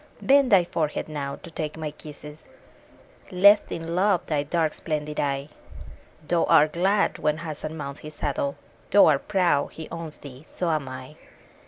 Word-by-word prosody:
Bend 275 -2 +4
thy 190 -3 +7
forehead 155 -3 -2
now, 140 -3 -4
to - - -10
take 155 -1 -4
my 155 -2 -4
kisses! 150 0 -11 0.8
Lift 200 +2 +5
in 165 0 -4
love 185 0 +2
thy 150 -2 0
dark 155 +2 0
and - - -13
splendid 150 -1 -3
eye: 140 0 -1 0.8
Thou 170 -1 +2
art 155 -2 +5
glad 195 +4 +1
when 150 0 +1
Hassan 155 -1 -6
mounts 140 -2 -6
his 155 0 -10
saddle, 140 0 -2 0.2
— - - -31
Thou 205 - +7
art 145 -3 +2
proud 180 -8 +1
he 160 - -8
owns 165 -2 -6
thee: 135 -1 -12
so 175 -2 -1
am 150 -4 -1
I. 130 +3 -9
155 Hz, 175 wpm, -25 LUFS, 145-170 Hz, 0.8 s, thy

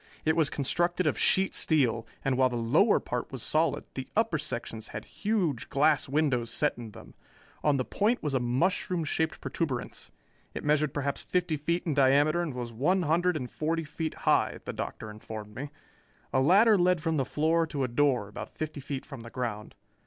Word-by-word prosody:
It 160 0 +3
was 160 -3 +3
constructed 175 +5 0
of 150 - +2
sheet 190 0 +3
steel, 125 -8 +2 0.2
and 135 -1 +2
while 130 0 +3
the 125 - -4
lower 140 - +3
part 125 -1 -4
was 130 -4 -5
solid, 155 -1 +1
the 130 -1 -5
upper 215 -8 +2
sections 115 -6 -4
had - - -7
huge 190 - -1
glass 145 -1 +2
windows 135 -5 +1
set 150 +5 0
in 120 -2 -8
them. 105 - -13 0.5
On 145 -2 +3
the 130 - -1
point 220 +4 0
was 150 -2 -1
a 130 - +2
mushroom 170 +8 0
shaped 160 +1 -1
protuberance. 140 -8 -4 0.5
It - - -4
measured 150 -1 +2
perhaps 140 0 -2
fifty 180 -3 0
feet 170 +4 -1
in 160 - 0
diameter 145 +4 +4
and 155 -7 -3
was 120 -2 -5
one 175 +11 +1
hundred 175 +2 +2
and 125 -4 -6
forty 165 +1 -1
feet 160 +1 -4
high, - - +3
the - - -4
Doctor - - -5
informed 105 0 -8
me. 140 +6 -6 0.6
A 130 - +3
ladder 200 - +5
led 180 0 +3
from 160 0 -1
the 135 - +2
floor 160 +5 +1
to 145 -4 -2
a - - +1
door 125 -3 +1
about 105 - -9
fifty 155 -1 -4
feet 135 -1 -5
from 140 -4 -9
the 115 - -9
ground. 115 -4 -5
150 Hz, 195 wpm, -29 LUFS, 130-165 Hz, 0.6 s, ladder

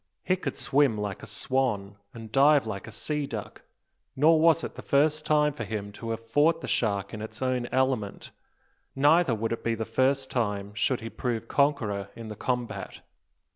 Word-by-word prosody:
He 185 - +2
could 155 -8 -4
swim 135 -5 +2
like 105 -2 -4
a - - -9
swan, 110 -7 -1
and 115 -2 -10
dive 140 0 +5
like 105 -2 -5
a - - -8
sea 145 +6 -3
duck; 110 -5 -7 0.5
nor 155 +4 +5
was 165 0 +4
it - - -5
the - - -9
first 155 +2 +2
time 150 -1 +3
for 150 - -5
him 105 -2 -4
to 115 +3 -7
have 115 0 -4
fought 155 +8 +3
the - - -6
shark 100 -3 0
in 110 - -5
its 110 0 -8
own 130 -2 -1
element; 130 -6 -1 0.6
neither 145 0 +4
would 115 +1 -2
it 115 - -6
be 115 0 0
the 110 0 -3
first 135 +2 +1
time 105 -4 -1
should 120 +5 0
he 115 - -5
prove 115 -3 -3
conqueror 110 -10 +1
in 115 -1 -8
the 105 - -6
combat. 125 +2 -3
120 Hz, 190 wpm, -27 LUFS, 110-140 Hz, 0.6 s, dive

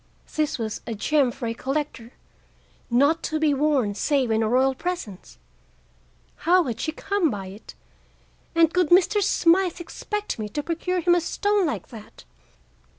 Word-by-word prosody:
This 310 0 0
was 220 -3 -4
a 230 - -3
gem 280 +5 +2
for 245 0 -6
a 230 - -1
collector, 265 -2 -4 0.8
not 280 +7 +3
to 310 - -2
be 305 -2 +3
worn 275 -7 +1
save 260 +2 0
in 220 0 +2
a 220 - +1
royal 260 +3 +3
presence. 260 - -6 1.0
How 360 +2 +3
had 235 -6 -4
she 315 - -2
come 395 0 0
by 200 -5 -5
it? 200 +4 -12 0.8
And 330 -1 +4
could 360 -4 +2
Mr. 380 +4 +4
Smythe 360 -2 +2
expect 415 - -5
me 210 -1 -4
to 295 +7 -4
procure 350 +3 -2
him 345 +1 +4
a 350 - +3
stone 405 +2 +1
like 300 - -4
that? 220 -4 -12
300 Hz, 160 wpm, -24 LUFS, 235-350 Hz, 1.0 s, And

